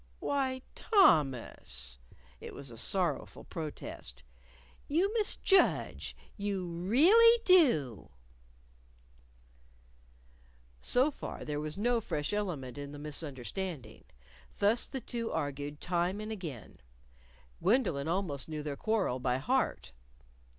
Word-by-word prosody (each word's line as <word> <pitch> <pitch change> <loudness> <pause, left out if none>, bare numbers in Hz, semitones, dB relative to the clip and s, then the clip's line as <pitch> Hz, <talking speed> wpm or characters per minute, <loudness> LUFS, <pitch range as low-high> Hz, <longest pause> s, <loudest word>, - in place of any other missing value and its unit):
"Why, 260 -2 -1
Thomas!" 130 - +2 0.4
It - - -9
was 135 -3 -6
a - - -10
sorrowful 175 0 0
protest. 150 - -6 0.6
"You 360 +8 +1
misjudge, 415 -3 +2 0.2
you 200 -3 -2
really 305 - +5
do." 195 - +4 2.7
So 260 +5 +3
far - - -7
there 150 -1 -2
was 155 +2 -4
no 235 +2 +1
fresh 150 -3 -2
element 150 - -3
in 145 0 -7
the - - -8
misunderstanding. 145 - -5 0.5
Thus 210 +4 +2
the 265 - -5
two 230 0 -4
argued 145 -1 -3
time 180 +2 -1
and 215 +1 -5
again. 160 - -7 0.8
Gwendolyn 185 - +2
almost 165 -5 -2
knew 155 -1 -4
their 145 -2 -3
quarrel 200 - 0
by 125 0 0
heart. 135 - -1
175 Hz, 105 wpm, -32 LUFS, 145-230 Hz, 2.7 s, really